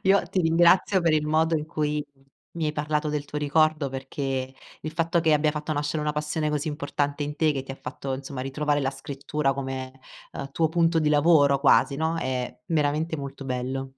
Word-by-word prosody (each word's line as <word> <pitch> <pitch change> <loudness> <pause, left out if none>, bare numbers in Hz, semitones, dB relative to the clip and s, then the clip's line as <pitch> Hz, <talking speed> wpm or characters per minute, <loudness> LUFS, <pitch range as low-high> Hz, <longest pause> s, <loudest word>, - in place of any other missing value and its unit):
Io 195 +1 +4
ti 185 - +1
ringrazio 170 +4 +4
per 165 -2 +2
il 150 -1 +1
modo 160 +1 +2
in 150 - -4
cui 150 -1 -1 0.5
mi 165 -2 -3
hai 150 - -1
parlato 150 0 -1
del 150 -1 -2
tuo 150 - -5
ricordo, 155 0 +2
perché, 135 0 -4 0.3
il 155 - -5
fatto 170 +1 +1
che 160 -1 +3
abbia 150 0 +3
fatto 150 +1 -3
nascere 150 +1 -1
una 150 0 0
passione 150 +1 -1
così 150 +1 -1
importante 145 -1 -2
in 145 0 -4
te, 155 0 +3
che 135 -2 -3
ti 135 - -10
ha - - -10
fatto, 135 -1 -5
insomma, 135 -1 -7
ritrovare 145 +2 0
la 135 -1 0
scrittura 140 +1 -2
come, 130 -1 -5 0.4
uhm, 140 0 -6
tuo 160 +1 +2
punto 165 0 +2
di 155 -1 +2
lavoro 145 -2 +5
quasi, 140 0 +4
no, 160 +2 0
è 125 -4 -3
veramente 155 +1 0
molto 140 -1 -7
bello. 130 +1 -3
150 Hz, 200 wpm, -25 LUFS, 140-160 Hz, 0.5 s, lavoro